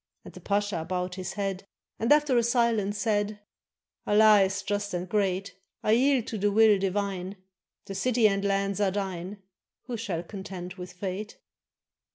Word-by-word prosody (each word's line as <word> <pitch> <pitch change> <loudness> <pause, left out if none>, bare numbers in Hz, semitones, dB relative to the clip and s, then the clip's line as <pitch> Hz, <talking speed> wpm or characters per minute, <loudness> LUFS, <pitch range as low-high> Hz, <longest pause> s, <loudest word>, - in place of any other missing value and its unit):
And - - -11
the - - -12
pasha 200 -4 -1
bowed 180 +1 -3
his 185 -1 -5
head, 195 -1 -3 0.3
And 230 +4 0
after 295 -3 +4
a 240 - +5
silence 230 -4 +1
said: 205 -1 0 0.7
"Allah 210 0 +6
is 195 +1 0
just 205 -1 -2
and 175 +1 -3
great! 195 -1 -1 0.3
I 215 - +2
yield 255 +1 +3
to 220 - -5
the 205 +1 +2
will 215 -1 +5
divine, 195 -1 -2 0.5
The 195 - -6
city 230 +3 +3
and 195 -1 0
lands 200 0 0
are 200 - +3
thine; 190 0 -4 0.4
Who 245 -2 -5
shall 190 -7 -3
contend 185 -1 -7
with 180 -1 -9
fate?" 195 +3 -5
200 Hz, 165 wpm, -27 LUFS, 190-215 Hz, 0.7 s, Allah